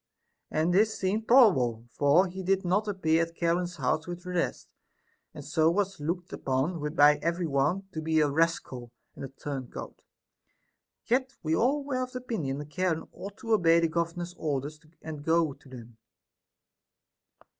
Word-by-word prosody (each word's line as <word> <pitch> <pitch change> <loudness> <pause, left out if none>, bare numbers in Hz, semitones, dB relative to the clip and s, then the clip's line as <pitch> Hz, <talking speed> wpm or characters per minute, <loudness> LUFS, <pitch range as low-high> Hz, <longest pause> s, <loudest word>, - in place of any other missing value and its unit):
And 160 +3 +1
this 215 +3 +3
seemed 210 +4 -1
probable, 130 - +5
for 145 +9 +4
he 190 +1 -6
did 190 +1 0
not 200 +5 +1
appear 165 -5 +1
at 165 0 -3
Charon's 175 +1 0
house 155 +3 -1
with 175 0 -6
the 180 - -6
rest, 175 -1 -2 0.6
and 150 -3 -10
so 160 +1 +2
was 195 +1 -1
looked 170 +4 -4
upon 135 +6 -1 0.2
by 150 -1 +6
every 170 +2 -1
one 150 +6 +1
to 160 - -5
be 160 0 +1
a 150 - +4
rascal 145 -5 -1 0.3
and - - -8
a - - -4
turn 135 -1 -6
coat; - - -9 1.0
yet 260 +2 0
we 160 0 +1
all 280 - +1
were 265 -2 -2
of 255 0 -5
opinion 220 - -3
that 150 +1 -8
Charon 170 0 -1
ought 200 0 -9
to 225 - -6
obey 170 -5 +5
the 165 -1 +1
governor's 170 +1 -3
orders 150 0 -3 0.2
and 155 -2 -7
go 160 -2 +2
to 135 - -19
them. 120 -3 -12
165 Hz, 165 wpm, -28 LUFS, 150-190 Hz, 1.0 s, by